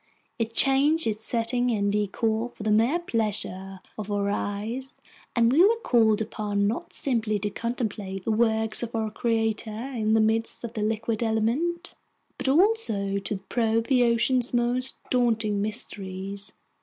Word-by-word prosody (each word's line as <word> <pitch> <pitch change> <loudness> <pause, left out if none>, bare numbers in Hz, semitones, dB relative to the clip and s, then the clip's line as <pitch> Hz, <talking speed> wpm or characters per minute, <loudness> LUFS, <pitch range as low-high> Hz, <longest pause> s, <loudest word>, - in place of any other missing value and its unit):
It 230 0 -2
changed 285 +4 +4
its 220 0 -2
setting 245 +2 0
and 205 -3 +1
decor 220 +3 0
for 225 - -10
the 215 - +1
mere 230 +9 +3
pleasure 200 - -3 0.2
of 210 -1 -5
our 200 0 0
eyes, 220 +7 -4 0.4
and 235 -1 +4
we 310 +7 +6
were 450 +4 +4
called 220 -3 +3
upon 205 -1 -1
not 215 +4 -2
simply 225 -5 0
to 205 +1 -3
contemplate 210 -6 -4
the 225 - -1
works 220 -1 +2
of 235 -1 -4
our 220 -1 -1
Creator 225 -1 0 0.3
in 220 -1 +1
the - - +4
midst 220 +2 +1
of 235 - -5
the 215 - -3
liquid 220 +1 -1
element, 235 +11 0 0.5
but - - -3
also 265 - +2
to 200 +1 -3
probe 230 0 0
the 255 -3 +4
ocean's 240 +1 +2
most 245 +2 +1
daunting 225 -4 +1
mysteries. 200 -2 -4
225 Hz, 155 wpm, -26 LUFS, 210-245 Hz, 0.5 s, we